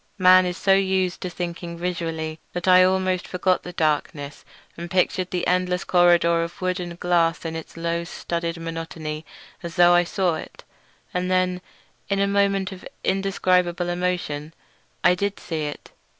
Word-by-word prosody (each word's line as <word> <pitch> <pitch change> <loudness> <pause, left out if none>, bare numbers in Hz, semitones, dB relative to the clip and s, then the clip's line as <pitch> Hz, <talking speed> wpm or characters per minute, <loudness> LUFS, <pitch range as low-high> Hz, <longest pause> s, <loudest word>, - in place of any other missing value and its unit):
Man 185 -1 +6
is 180 0 -3
so 195 - +3
used 190 -2 +1
to 180 - -3
thinking 170 -1 -5
visually 165 -2 -3
that 175 +1 -4
I 185 0 +7
almost 185 -1 +1
forgot 185 0 +1
the 180 - -8
darkness 150 -3 -2 0.3
and 170 +1 -7
pictured 185 0 +1
the 180 -1 -2
endless 180 0 +1
corridor 175 -1 +4
of 170 +1 -5
wood 185 0 -1
and 175 -1 -6
glass 170 -1 +1
in 165 0 -3
its 160 0 -8
low 170 0 -1
studded 170 0 -4
monotony 165 -1 -6 0.3
as 170 -2 -7
though 175 -1 +6
I 175 0 +5
saw 175 -2 0
it. - - -10 0.5
And 180 0 -1
then 185 -1 +1 0.5
in 200 - +1
a 200 - +3
moment 200 -1 +1
of 185 -1 -10 0.2
indescribable 185 -2 +1
emotion 175 -4 -2 0.5
I - - +6
did 200 +2 -2
see 160 -3 -3
it. 145 - -7
175 Hz, 165 wpm, -23 LUFS, 170-185 Hz, 0.5 s, I